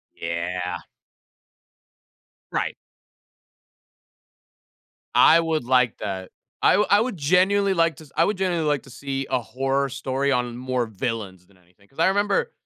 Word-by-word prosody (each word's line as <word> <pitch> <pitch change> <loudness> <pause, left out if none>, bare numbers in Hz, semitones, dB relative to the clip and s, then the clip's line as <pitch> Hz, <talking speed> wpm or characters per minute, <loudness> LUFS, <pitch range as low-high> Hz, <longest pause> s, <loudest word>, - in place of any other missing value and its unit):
Yeah. 90 +2 -3 1.8
Right. - - -1 2.4
I 165 - +7
would 160 -5 -1
like 125 -2 +2
that. 95 -3 -5 0.3
I - - +5
wou 210 - +3
I 205 - +6
would 230 -4 -2
genuinely 190 +6 +3
like 165 -2 +1
to 155 - -12
s 140 - -21
I 165 - +4
would 205 0 -1
genuinely 175 -4 0
like 145 -2 0
to - - -15
see 135 +1 -4
a 130 - +1
horror 135 +3 -1
story 135 +1 -1
on 125 -2 -1
more 125 -1 -1
villains 105 -4 -5
than 95 0 -26
anything, 90 +3 -27
'cause 135 - -19
I 165 - +4
remember 205 - +1
135 Hz, 145 wpm, -23 LUFS, 115-165 Hz, 2.4 s, I